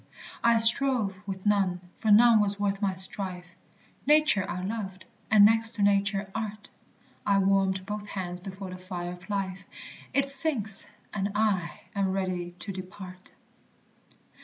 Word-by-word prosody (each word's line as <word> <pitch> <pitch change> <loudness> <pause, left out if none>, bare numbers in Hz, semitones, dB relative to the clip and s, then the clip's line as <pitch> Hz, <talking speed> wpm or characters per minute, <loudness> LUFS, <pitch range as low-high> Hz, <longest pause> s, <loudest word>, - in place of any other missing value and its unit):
I 235 0 +4
strove 225 -4 +4
with 190 0 -6
none, 195 -3 +1 0.2
for 220 - -2
none 225 +2 +6
was 205 -1 0
worth 200 0 -1
my 195 -2 0
strife; 185 -2 0 0.5
Nature 300 -10 +3
I 180 - -4
loved, 195 -3 -6 0.2
and 210 -2 +7
next 225 +1 +3
to 205 - -1
Nature, 200 0 +1
Art; 215 -1 -6 0.5
I 200 -1 +2
warmed 190 -1 +1
both 210 +1 -6
hands 180 -3 -5
before 190 0 -8
the 185 - -7
fire 180 -1 -6
of 180 +3 -12
life, 195 -1 -3 0.5
It 275 0 +1
sinks, 265 -8 +3 0.3
and 200 -1 -2
I 205 -5 -1
am 195 -2 0
ready 180 -2 -3
to 200 - -4
depart. 185 0 -10
195 Hz, 145 wpm, -27 LUFS, 185-215 Hz, 0.5 s, and